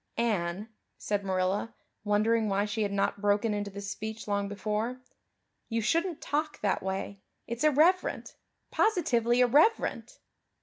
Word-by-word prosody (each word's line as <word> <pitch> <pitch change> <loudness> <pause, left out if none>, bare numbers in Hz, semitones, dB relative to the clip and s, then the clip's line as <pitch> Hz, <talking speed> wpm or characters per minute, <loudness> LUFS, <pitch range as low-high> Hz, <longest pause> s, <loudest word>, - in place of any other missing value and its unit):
"Anne," 205 -3 -1 0.3
said 205 -1 -2
Marilla, 190 +3 -1 0.3
wondering 215 +1 +2
why 200 +1 +1
she 210 +1 -3
had 205 -1 0
not 200 0 -1
broken 205 +1 +2
into 205 0 -3
this 200 0 -6
speech 220 +1 -6
long 200 -1 0
before, 215 +5 -2 0.7
"you 230 -1 0
shouldn't 330 - 0
talk 305 +1 -2
that 200 -2 0
way. 190 +1 -4 0.2
It's 235 +3 -4
irreverent 310 +5 +2 0.4
positively 250 - +2
irreverent." 295 - +2
215 Hz, 130 wpm, -29 LUFS, 200-245 Hz, 0.7 s, wondering